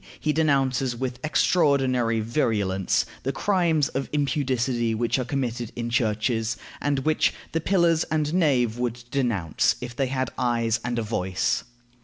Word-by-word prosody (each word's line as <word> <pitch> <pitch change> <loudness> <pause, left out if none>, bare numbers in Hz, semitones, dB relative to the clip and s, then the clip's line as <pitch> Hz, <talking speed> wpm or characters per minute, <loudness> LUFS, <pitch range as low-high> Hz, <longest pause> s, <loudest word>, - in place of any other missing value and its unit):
He 155 - 0
denounces 135 -5 +1
with 125 0 -4
extraordinary 135 -8 +2
virulence 105 -6 0 0.2
the 135 - -1
"crimes 170 -5 +1
of 135 0 -3
impudicity 130 -5 0
which 120 +3 0
are 130 - -1
committed 120 -3 -3
in 120 0 -3
churches," 110 -1 0 0.2
and 145 -1 +1
which 155 0 +2 0.2
"the 165 - -1
pillars 170 -2 +3
and 155 0 -1
nave 125 -10 +2
would 120 -1 -2
denounce, 115 - +1
if 120 -1 -7
they 135 +1 0
had 130 -1 -2
eyes 115 -2 +1
and 125 -1 -2
a 115 - 0
voice." 95 -4 -1
125 Hz, 145 wpm, -25 LUFS, 115-145 Hz, 0.2 s, pillars